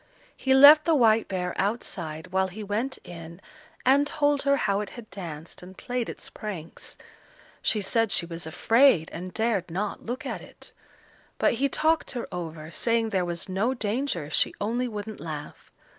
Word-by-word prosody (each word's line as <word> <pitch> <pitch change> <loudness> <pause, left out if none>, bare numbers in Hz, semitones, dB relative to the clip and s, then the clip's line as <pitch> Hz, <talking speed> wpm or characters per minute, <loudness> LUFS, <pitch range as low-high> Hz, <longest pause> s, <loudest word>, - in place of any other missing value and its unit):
He 265 0 +2
left 290 +3 +9
the 330 -2 +4
white 225 -4 +4
bear 180 -2 -2
outside 175 -6 -3
while 190 0 +2
he 205 +4 -8
went 220 +7 -2
in 170 0 -10 0.5
and 280 +3 +4
told 290 -2 +1
her 280 0 +3
how 200 -6 +1
it 210 - -4
had 235 -2 -9
danced 165 -4 -8
and 185 +1 -12
played 245 -2 -3
its - - -6
pranks. 180 -7 -8 0.6
She 215 - +1
said 225 +2 +1
she 170 - +2
was 165 -1 -5
afraid, 225 - +4
and 180 +2 -6
dared 220 -4 0
not 195 +5 -3
look 245 +2 -4
at - - -4
it; - - -11 0.6
but - - +3
he 280 - +3
talked 315 +2 +1
her 245 - -4
over, 160 -2 -6
saying 230 +5 +1
there 190 -4 0
was 170 -1 -4
no 205 +7 0
danger 225 - -1
if 150 - -10
she - - +2
only 235 +5 -1
wouldn't 215 -1 -6
laugh. 150 -2 -8
210 Hz, 175 wpm, -26 LUFS, 175-245 Hz, 0.6 s, left